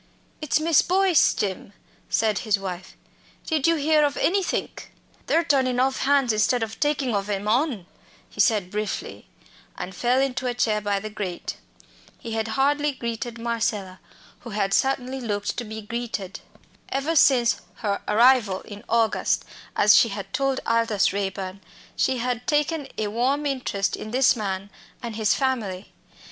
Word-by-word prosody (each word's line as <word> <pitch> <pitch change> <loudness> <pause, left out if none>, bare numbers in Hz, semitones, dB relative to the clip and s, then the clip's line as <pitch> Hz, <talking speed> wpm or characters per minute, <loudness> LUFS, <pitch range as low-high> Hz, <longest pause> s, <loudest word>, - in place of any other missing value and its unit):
"It's 305 0 +1
Miss 320 -1 +4
Boyce, 370 -2 +4
Jim," 195 0 -3 0.4
said 220 -2 +1
his 215 -3 +1
wife. 190 -2 -7 0.5
"Did 315 -2 +1
you 335 - +4
hear 305 0 +3
of 285 -1 0
anythink?" 385 +1 -1 0.4
"They're 335 - +3
turnin' 260 -5 +2
off 265 +1 +1
hands 275 -4 +3
instead 225 +3 +2
of 220 0 -6
takin' 285 -4 0
ov 200 0 -1
'em 205 0 -2
on," 240 - +1 0.4
he - - -17
said 205 -6 +2
briefly, 210 -1 -4 0.5
and 185 - -6
fell 245 +5 +1
into 260 -1 -1
a 245 - -1
chair 215 -3 +1
by 200 -1 0
the 215 +2 -7
grate. 190 -4 -5 0.6
He 230 - -8
had 225 0 -1
hardly 290 +2 +2
greeted 235 -1 -5
Marcella, 220 -5 -2 0.4
who 240 - -10
had 200 -2 -1
certainly 265 +1 0
looked 205 -3 -2
to 245 - -2
be 220 -1 -7
greeted. 220 -4 -5 0.5
Ever 280 +5 -1
since 250 -5 +4
her 205 -4 -2
arrival 220 -3 +4
in 205 -1 -11
August, 225 -1 +1 0.3
as 205 0 +6
she 230 - +5
had 200 +2 -7
told 270 0 0
Aldous 230 -4 +2
Raeburn, 195 -1 -4 0.3
she 260 - +1
had 245 0 -3
taken 295 0 0
a 210 -1 -1
warm 260 +7 0
interest 250 -8 -1
in 215 - -7
this 255 +2 +4
man 195 -2 -4 0.3
and 230 -2 -5
his 215 -1 +2
family. 220 -9 -2
235 Hz, 155 wpm, -24 LUFS, 205-270 Hz, 0.6 s, as